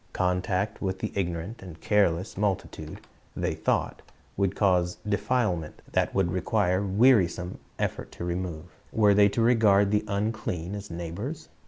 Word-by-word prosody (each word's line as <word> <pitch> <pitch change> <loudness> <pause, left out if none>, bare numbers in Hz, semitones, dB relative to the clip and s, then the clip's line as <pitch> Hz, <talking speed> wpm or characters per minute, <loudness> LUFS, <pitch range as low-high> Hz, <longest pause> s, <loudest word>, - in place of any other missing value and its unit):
Contact 95 +3 0
with 95 -1 -1
the - - -3
ignorant 90 +3 -3
and 90 -4 -10
careless 100 -2 +1
multitude, 95 -6 -3 0.3
they - - -1
taught, - - -1 0.3
would 100 -1 0
cause 90 -3 +2
defilement 100 -5 -1
that - - 0
would 95 -3 +2
require 95 +1 +1
wearisome 95 -4 +3 0.2
effort - - -3
to 85 - -6
remove. 85 -2 -3 0.3
Were 105 -2 +4
they 100 0 +6
to 110 +4 -1
regard 105 -4 +4
the 105 0 +2
"unclean" 100 -4 -2
as 105 0 -6
neighbors? 90 - -5
95 Hz, 140 wpm, -27 LUFS, 90-105 Hz, 0.3 s, they